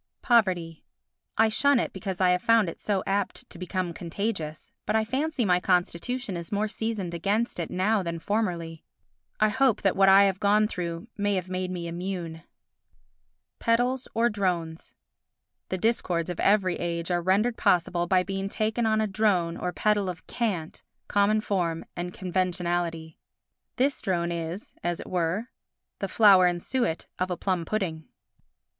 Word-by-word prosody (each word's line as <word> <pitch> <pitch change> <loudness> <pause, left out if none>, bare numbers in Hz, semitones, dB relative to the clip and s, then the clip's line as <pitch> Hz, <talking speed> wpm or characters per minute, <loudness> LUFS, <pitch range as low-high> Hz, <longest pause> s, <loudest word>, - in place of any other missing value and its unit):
Poverty 180 -9 +2 0.5
I 225 - +5
shun 280 +4 +3
it - - -2
because 190 -4 -5
I 185 -1 +4
have 180 0 +1
found 230 -2 +4
it - - -9
so 200 -3 -1
apt 200 0 -2
to 170 - -11
become 185 -1 -3
contagious; 165 -3 -4 0.2
but 210 - +1
I 220 0 +2
fancy 270 +2 -1
my 180 -2 +3
constitution 190 +6 -1
is 170 -1 -7
more 210 +1 0
seasoned 210 -5 -3
against 200 +6 -1
it 170 - -3
now 205 +3 +1
than 170 -2 -3
formerly. 170 -4 -2 0.6
I 215 - +4
hope 260 +1 +2
that 195 - +2
what 195 0 +5
I 195 +1 +8
have 195 -1 +1
gone 210 +1 +3
through 170 -1 -5
may 205 0 +1
have 185 -1 -3
made 185 0 -2
me 180 -2 -4
immune. 170 -2 -5 1.2
Pedals 245 +3 +1
or 230 +1 +3
Drones 175 -6 -2 0.7
The 185 - -1
discords 180 -5 0
of 175 - -7
every 195 -3 +3
age 170 0 -3
are 175 0 +1
rendered 200 +7 +2
possible 175 -2 +1
by 185 0 +3
being 195 +1 -3
taken 220 +2 0
on 220 0 +2
a - - +2
drone 190 -5 +1
or 180 - -3
pedal 205 0 +1
of 180 -1 -7
cant, 190 -9 -3 0.3
common 205 +1 +2
form 175 -6 -1
and 175 +1 -4
conventionality. 175 -3 -2 0.6
This 275 +2 +1
drone 175 -2 -1
is, 170 +3 -5
as 175 -1 -1
it - - -8
were, 180 +7 -1 0.5
the 195 - -2
flour 190 -2 +6
and 175 0 0
suet 240 -5 -1
of 185 0 0
a 180 - -2
plum 185 -4 -1
pudding. 165 -7 -3
185 Hz, 165 wpm, -27 LUFS, 175-215 Hz, 1.2 s, I